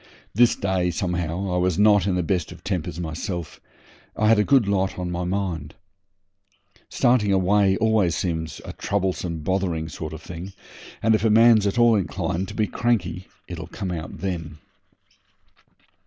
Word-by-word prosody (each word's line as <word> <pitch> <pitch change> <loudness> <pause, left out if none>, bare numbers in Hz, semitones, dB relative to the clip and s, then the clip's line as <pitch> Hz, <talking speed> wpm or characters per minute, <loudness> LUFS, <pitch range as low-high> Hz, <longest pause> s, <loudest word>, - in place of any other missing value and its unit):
This 120 +3 +4
day, 95 -2 0
somehow, 90 0 -2
I - - +1
was 90 -2 +1
not 105 -2 +4
in 95 - +1
the 90 - 0
best 85 0 -1
of - - -12
tempers 90 -4 -3
myself. 85 +1 -5 0.6
I 110 0 +3
had 115 -1 +5
a - - +4
good 130 -3 +3
lot 95 -1 0
on 90 -1 -3
my 90 0 -3
mind. 90 -5 -3 1.1
Starting 120 -5 +2
away 95 +1 +3 0.4
seems 80 -2 -3
always - - -12
a - - -7
troublesome, 90 -4 -2
bothering 85 -3 -1
sort 80 +1 -6
of 80 0 -9
thing, 90 +3 -8 0.5
and 110 +1 +4
if 110 - +1
a 110 - +3
man's 110 -1 +6
at 100 - -2
all 120 -1 +5
inclined 95 -1 -2
to 105 - -9
be 110 - +1
cranky 95 -6 -1 0.2
it'll 85 -2 -7
come 95 +1 -5
out 80 -3 -6
then. 85 -4 -4
95 Hz, 165 wpm, -23 LUFS, 85-105 Hz, 1.1 s, man's